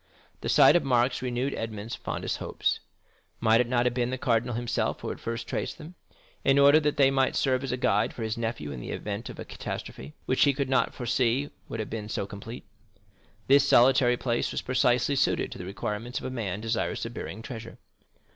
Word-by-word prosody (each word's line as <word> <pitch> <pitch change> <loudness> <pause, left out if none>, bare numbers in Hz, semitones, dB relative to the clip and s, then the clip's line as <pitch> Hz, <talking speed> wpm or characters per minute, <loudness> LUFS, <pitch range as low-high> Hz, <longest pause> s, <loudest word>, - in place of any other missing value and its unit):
The - - -4
sight - - +7
of 175 - +3
marks 125 -1 +2
renewed 125 +2 -1
Edmond 110 0 -5
fondest - - -3
hopes. - - -1 0.6
Might 115 +1 +4
it 125 - -1
not 120 0 +1
have 125 - +2
been 120 -1 0
the 130 - -2
cardinal 120 -3 0
himself 120 0 -1
who - - -4
had - - -5
first 115 0 -4
traced - - -3
them, 160 +2 -10 0.5
in 135 0 +4
order 140 +2 +7
that 150 -1 0
they 135 -1 +5
might 135 -1 +2
serve 130 -1 +1
as 135 - -3
a 125 - -1
guide 105 -4 +2
for 115 - -6
his 110 0 -2
nephew 115 -11 -3
in 65 - -6
the - - -7
event 105 +3 -4
of - - -9
a - - -7
catastrophe, 70 +3 -7
which 130 - 0
he 140 - +4
could 140 -1 -1
not 130 - +1
foresee 125 +3 0 0.2
would 115 - -5
have 110 - -4
been 110 -2 -5
so 100 - -2
complete. 105 +5 -9 0.8
This 140 +1 +5
solitary 125 0 +5
place 120 -1 -1
was - - -3
precisely 125 +1 +2
suited - - +1
to - - -8
the 90 - -6
requirements 105 +5 -4
of - - -5
a 130 - -3
man 105 -5 -3
desirous 115 0 -2
of 115 - -6
burying 110 - -6
treasure. 115 -2 -8
120 Hz, 210 wpm, -27 LUFS, 115-130 Hz, 0.8 s, sight